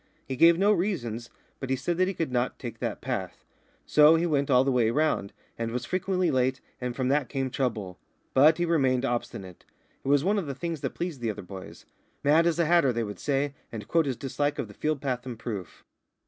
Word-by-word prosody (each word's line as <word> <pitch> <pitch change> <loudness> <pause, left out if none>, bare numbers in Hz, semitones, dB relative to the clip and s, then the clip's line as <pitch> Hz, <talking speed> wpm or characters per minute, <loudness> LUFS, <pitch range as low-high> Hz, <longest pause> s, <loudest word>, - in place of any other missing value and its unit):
He 130 - -3
gave 165 +5 +6
no 200 +3 +4
reasons, 120 - -2 0.3
but 135 - -5
he 135 - +2
said 165 +7 -2
that 185 0 +3
he 195 - -3
could 165 -5 -2
not 125 0 0
take 115 -3 -7
that 115 -4 -3
path. 115 -8 -4 0.4
So 150 +1 +6
he 165 +1 +1
went 145 -4 +1
all 125 -1 +5
the 135 - +1
way 120 -3 +3
round, 145 -6 0 0.3
and 115 0 -1
was 125 +1 -3
frequently 185 0 0
late, 130 0 +1 0.2
and 125 -1 -3
from 130 -1 -1
that 140 -3 +1
came 135 -2 -2
trouble. 110 -9 -2 0.3
But 150 +4 +6
he 175 - +1
remained 135 -6 +2
obstinate. 100 -7 -4 0.4
It - - -8
was 140 0 +4
one 205 +3 +2
of 175 - -5
the 140 - -4
things 165 0 -4
that - - -3
pleased 170 -7 -4
the 115 - -1
other 105 -2 -5
boys. 95 +1 -10 0.4
"Mad 155 +4 +4
as 170 - +1
a 170 - +2
hatter," 165 -5 +4
they 115 -1 -1
would 105 -2 -6
say, 140 0 0 0.2
and 110 -2 -7
quote 165 +3 +2
his 130 -3 -2
dislike 145 +2 -2
of 115 - -3
the 105 - -12
field 150 +4 -2
path 125 -3 -2
in 120 -3 -5
proof. 105 -6 -6
135 Hz, 230 wpm, -27 LUFS, 120-160 Hz, 0.4 s, gave